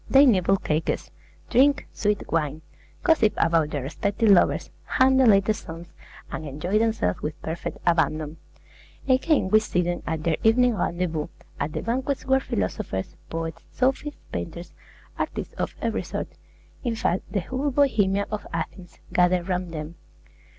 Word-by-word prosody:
They 275 +1 +7
nibble 195 -5 +4
cakes, 155 -3 -2 0.4
drink 275 +4 +4
sweet 210 -1 0
wine, 155 -1 0 0.4
gossip 310 -11 +4
about 165 -2 +3
their 145 -3 -3
respective 200 - +1
lovers, 190 - +3
hum 260 0 +3
the 260 -2 +5
latest 205 0 +4
songs, 170 0 -9 0.4
and - - -4
enjoy 155 +8 -1
themselves 220 - 0
with 155 +1 -4
perfect 160 +2 -4
abandon. 160 -2 +1 0.7
Again 260 - +3
we 215 - +6
see 180 -5 0
them 175 0 -2
at 160 -1 -2
their 160 -1 +1
evening 245 +2 +4
rendezvous, 170 -5 -1 0.3
at 150 +2 -2
the - - -3
banquets 260 +4 -1
where 265 0 +4
philosophers, 95 - -3
poets, 165 0 -4
sophists, 270 +3 -1
painters, 170 - -5 0.5
artists - - -3
of - - -3
every - - 0
sort, - - -4 0.5
in 240 -3 -1
fact, 190 -4 -1
the 200 - 0
whole 260 - -2
Bohemia 210 -8 +2
of 215 -1 -4
Athens, 170 +2 -5 0.2
gather 180 0 +3
round 180 -1 -2
them. 155 0 -5
185 Hz, 150 wpm, -25 LUFS, 160-230 Hz, 0.7 s, They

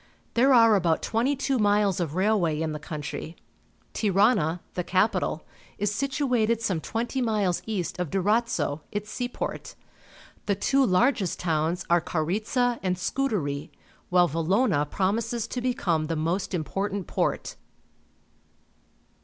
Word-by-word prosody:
There 260 +4 +4
are 230 -3 +7
about 170 -4 +1
twenty 245 +6 +1
two 270 -1 0
miles 205 -2 +2
of 165 -3 -2
railway 185 -6 +2
in 160 -1 -1
the 150 - -5
country. 150 +1 -6 0.6
Tirana, 195 -5 +2
the 180 - -2
capital 185 -3 0 0.3
is 205 0 0
situated 250 -3 +1
some 190 -8 -1
twenty 240 - -2
miles 210 -7 +1
east 190 -5 -3
of 180 -4 -2
Durazzo, 200 -5 0
its 210 +1 -4
seaport. 245 0 -4 0.7
The 200 - +2
two 270 +7 +2
largest 220 - +2
towns 165 0 0
are 170 0 +3
Coriza 215 - 0
and 185 -1 -1
Scutari, 175 - -2 0.4
while 180 -1 +5
Valona 165 - +1
promises 220 +5 -1
to 250 - -3
become 175 -11 0
the 165 - -1
most 170 +5 -1
important 195 +4 -2
port. - - -2
195 Hz, 130 wpm, -26 LUFS, 170-230 Hz, 0.7 s, are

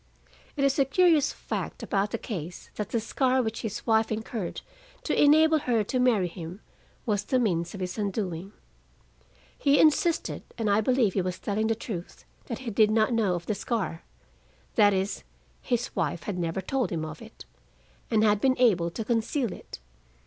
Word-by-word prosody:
It 275 - +1
is 275 +1 +2
a 275 - +5
curious 320 0 +4
fact - - -5
about 200 +1 0
the - - -2
case 175 -5 -7
that 210 -2 -4
the 230 - 0
scar 260 +3 +1
which 220 0 -3
his 215 -2 -5
wife 220 -1 +2
incurred 220 -3 -4 0.4
to - - -1
enable 315 +2 +6
her 235 -6 +1
to 255 +5 -2
marry 230 -7 +3
him 170 +2 -8 0.5
was 205 -3 0
the 255 - +1
means 175 -7 0
of 195 - -7
his 180 +3 -4
undoing. 195 -3 -3 1.0
He 285 0 +3
insisted, 320 +2 +2 0.2
and 220 -3 0
I 205 +2 +4
believe 240 -4 +2
he 195 - +1
was 180 0 -3
telling 215 +1 -1
the 225 - +1
truth, 195 -6 -7 0.2
that 235 - -4
he 230 - -2
did 215 +1 +4
not 215 +2 +2
know 210 -6 +2
of 170 -1 -5
the 215 - 0
scar: 200 -6 -3 0.7
that 205 -1 +5
is, 195 +1 -1 0.4
his 245 -1 -2
wife 160 +1 -1
had 190 -4 -3
never 170 +2 -2
told 255 +4 -1
him 160 -3 -2
of 155 +5 -8
it, 225 0 -12 0.6
and 220 -2 +3
had 210 -1 +3
been 260 -1 +3
able 195 -9 +3
to 215 +6 -5
conceal 235 0 0
it. - - -10
215 Hz, 185 wpm, -27 LUFS, 190-250 Hz, 1.0 s, enable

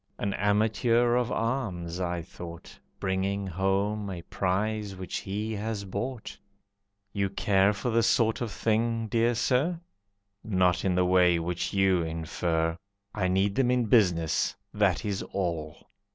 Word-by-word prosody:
"An 100 -1 -2
amateur 110 +4 +2
of 125 0 +1
arms," 95 -8 -2
I 85 -2 -2
thought, 85 0 -10 0.2
"Bringing 95 +1 -1
home 100 +3 -1
a 90 -3 -6
prize 100 +3 -1
which 95 -1 -5
he 105 +3 -3
has 105 -1 -3
bought." 120 +4 -5 0.7
"You 100 -1 0
care 95 0 +3
for 105 +4 -3
this 115 -1 +3
sort 115 -1 +2
of 115 -3 -2
thing, 115 +1 0
Dear 115 +2 +2
Sir?" 145 +9 +1 0.6
"Not 90 -4 +2
in 95 -2 +1
the 90 0 +3
way 90 -1 +4
which 85 +1 -2
you 95 -2 +3
infer. 80 0 -1 0.4
I 95 -3 0
need 95 +2 +2
them 125 +2 +2
in 125 -1 +2
business, 90 -8 +2 0.2
that - - +1
is 100 -2 -2
all." 85 -5 -4
100 Hz, 140 wpm, -28 LUFS, 90-110 Hz, 0.7 s, way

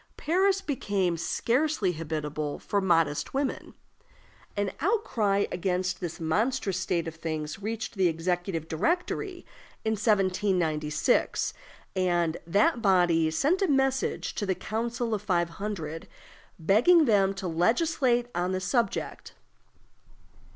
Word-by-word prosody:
Paris 380 +4 +2
became 200 - -1
scarcely 235 - 0
habitable 155 -2 -4
for 200 - -1
modest 165 - +1
women. 275 -1 -2 0.8
An 205 -2 0
outcry 235 - +1
against 180 0 -1
this 175 -3 -5
monstrous 195 +4 0
state 170 -2 -1
of 165 - -5
things 155 +1 -5
reached 220 +2 -4
the 190 -4 +2
Executive 170 0 -2
Directory 350 - -1 0.4
in 220 - +2
1796, 185 - +1 0.4
and 175 -3 +1
that 215 - +2
body 175 -5 +3
sent 290 - +1
a 390 - +3
message 270 -2 0
to 205 - -3
the 190 - +1
Council 230 +3 -3
of 210 - -1
Five 175 -4 +1
Hundred, 165 -7 -4 0.5
begging 235 - +5
them 195 -4 +3
to 195 -1 -4
legislate 240 - +2
on 180 +2 -1
the 185 - 0
subject. 235 +5 -2
195 Hz, 115 wpm, -28 LUFS, 170-240 Hz, 0.8 s, begging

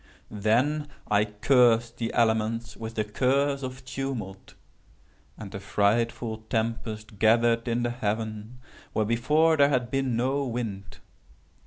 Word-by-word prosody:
"Then 125 +9 +1 0.2
I 105 0 +4
cursed 115 +2 +3
the 115 -1 -2
elements 115 0 +1
with 115 0 -7
the 110 - +1
curse 135 +6 +1
of 130 0 -7
tumult; 125 -8 -5 0.8
and 100 -3 -9
a 100 - -5
frightful 110 +3 0
tempest 110 -2 -3
gathered 115 +1 +3
in 120 0 0
the 120 - 0
heaven 110 0 -4 0.4
where, 110 - +1
before, 150 +8 +3
there 140 0 +5
had 125 -4 0
been 135 -3 0
no 135 +4 0
wind. 100 -6 -5
115 Hz, 130 wpm, -27 LUFS, 110-130 Hz, 0.8 s, there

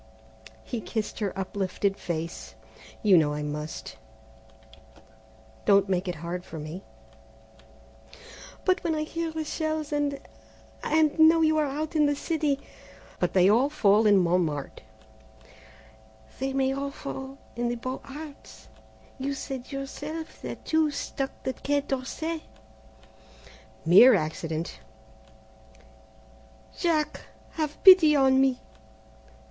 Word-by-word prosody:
He 240 -3 -5
kissed 220 -1 -4
her 205 -3 -1
uplifted 195 +1 -1
face; 170 -2 -5 0.5
"You 195 -5 +7
know 150 -2 +1
I 150 - -3
must; 150 -7 -6 1.7
don't 200 0 +5
make 185 0 0
it 180 - -2
hard 180 +1 -4
for 160 - -9
me." 155 +5 -7 1.8
"But 370 0 +2
when 330 -2 0
I 305 - -1
hear 330 +1 -3
the 315 0 -4
shells 310 -1 -2
and 290 -1 0 0.6
and 310 0 +2
know 320 +1 +7
you 310 -1 +3
are 300 - +1
out 305 +4 -4
in 300 -1 +4
the 290 - +1
city 295 -2 -1 0.3
" - - -22
"But - - 0
they 185 -1 +5
all 240 +7 +4
fall 215 -7 +4
in 205 -1 +6
Montmartre 170 -5 0 0.8
" 110 0 -24
"They 270 +1 -1
may 270 0 +1
all 280 +1 -3
fall 270 -1 -7 0.2
in 240 0 -1
the 240 - -1
Beaux 255 +2 -5
Arts; 290 +1 -11 0.5
you 275 +1 -2
said 265 -1 -6
yourself 295 +4 -6
that - - -7
two 315 -1 +2
struck 275 -1 -5
the 260 - -2
Quai 285 +2 0
d'Orsay 300 +5 -3 0.8
" 110 0 -24
"Mere 215 +9 +8
accident 160 -1 -3 1.0
" 110 0 -25
"Jack, 310 -4 0 0.3
have 310 -2 -4
pity 365 -6 +9
on 265 -1 +4
me! 265 -2 +2
265 Hz, 130 wpm, -27 LUFS, -, 1.8 s, pity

